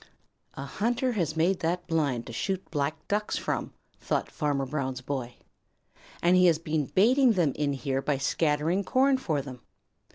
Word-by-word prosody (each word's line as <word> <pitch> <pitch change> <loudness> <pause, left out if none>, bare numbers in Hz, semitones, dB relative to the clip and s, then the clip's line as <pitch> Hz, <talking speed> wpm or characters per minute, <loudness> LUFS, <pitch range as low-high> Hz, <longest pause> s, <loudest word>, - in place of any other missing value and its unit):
"A 135 - -5
hunter 240 - 0
has 170 - -1
made 175 +3 +2
that 175 +1 -1
blind 145 -8 0
to 115 - -8
shoot 190 - -3
Black 150 +1 -2
Ducks 210 +1 -1
from," - - -2 0.3
thought - - -2
Farmer 145 -3 -1
Brown's 130 -2 -3
boy, 125 -3 -4 0.9
"and 175 +1 +5
he 180 0 +6
has 165 -3 +4
been 155 -3 -2
baiting 245 +5 +4
them 170 -8 +1
in 145 -1 0
here 135 -1 -2
by 145 0 0
scattering 155 +6 +1
corn 265 +5 +3
for 155 - -1
them. 130 -3 -9
160 Hz, 165 wpm, -28 LUFS, 140-185 Hz, 0.9 s, he